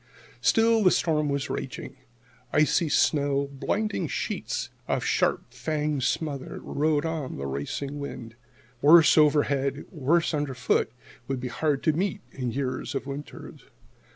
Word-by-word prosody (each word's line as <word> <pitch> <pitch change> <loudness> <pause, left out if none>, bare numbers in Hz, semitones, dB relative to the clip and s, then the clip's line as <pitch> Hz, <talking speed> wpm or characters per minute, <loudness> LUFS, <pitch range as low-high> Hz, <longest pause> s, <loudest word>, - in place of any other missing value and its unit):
Still 225 -1 +4
the 185 - +7
storm 150 -4 +1
was 140 -1 -1
raging. 130 0 -5 0.6
Icy 155 +2 +3
snow, 140 -2 +2
blinding 210 +10 -1
sheets - - -3 0.2
of - - -1
sharp - - 0
fanged 150 -2 -1
smother, 140 +1 -2
rode 150 +1 0
on 160 -5 -3
the 70 - -4
racing 70 - -4
wind. 125 -5 -7 0.5
Worse 160 +1 +7
overhead, 145 -2 +2
worse 165 +2 +1
underfoot, 135 -6 0 0.4
would 135 -1 -2
be 125 0 -4
hard 145 +3 -1
to 155 - +3
meet 185 +4 -1
in 125 -2 -3
years 135 +3 -3
of 135 - -2
winters. 140 +1 -8
145 Hz, 130 wpm, -26 LUFS, 135-155 Hz, 0.6 s, the